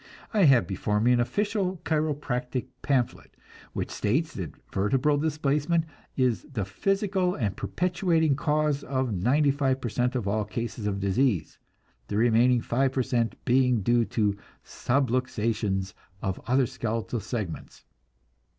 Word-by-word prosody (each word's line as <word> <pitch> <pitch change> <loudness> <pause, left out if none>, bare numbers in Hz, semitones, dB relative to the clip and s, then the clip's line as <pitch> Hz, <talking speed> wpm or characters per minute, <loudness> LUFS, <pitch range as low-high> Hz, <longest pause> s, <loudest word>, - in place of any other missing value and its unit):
I 205 -4 +5
have 135 -5 +6
before 105 +2 -1
me 120 +3 +3
an 125 - +4
official 195 - 0
chiropractic 140 -5 -1 0.2
pamphlet 130 -4 -1 0.4
which - - -3
states 150 +10 0
that 85 -7 -6 0.2
vertebral 135 +9 +2
displacement 150 +2 +1 0.3
is 125 -4 +2
"the 110 -8 -2
physical 190 - 0
and 105 -8 -1
perpetuating 170 -4 +1
cause 150 0 0
of 130 -3 -1
ninety 140 +10 +3
five 135 -2 0
per 120 - -3
cent 125 +3 0
of 120 -6 -1
all 105 +2 +1
cases 115 0 -4
of 100 -1 -1
disease; 100 - 0 0.5
the 100 - -2
remaining 120 +2 +4
five 130 +3 +1
per 130 - +1
cent 120 -2 0
being 125 -3 +3
due 120 +3 +3
to 105 -3 0 0.3
subluxations 115 -6 0 0.3
of 95 -1 -2
other 130 +1 +3
skeletal 115 -2 -3
segments." 105 -6 -6
125 Hz, 135 wpm, -27 LUFS, 110-145 Hz, 0.5 s, have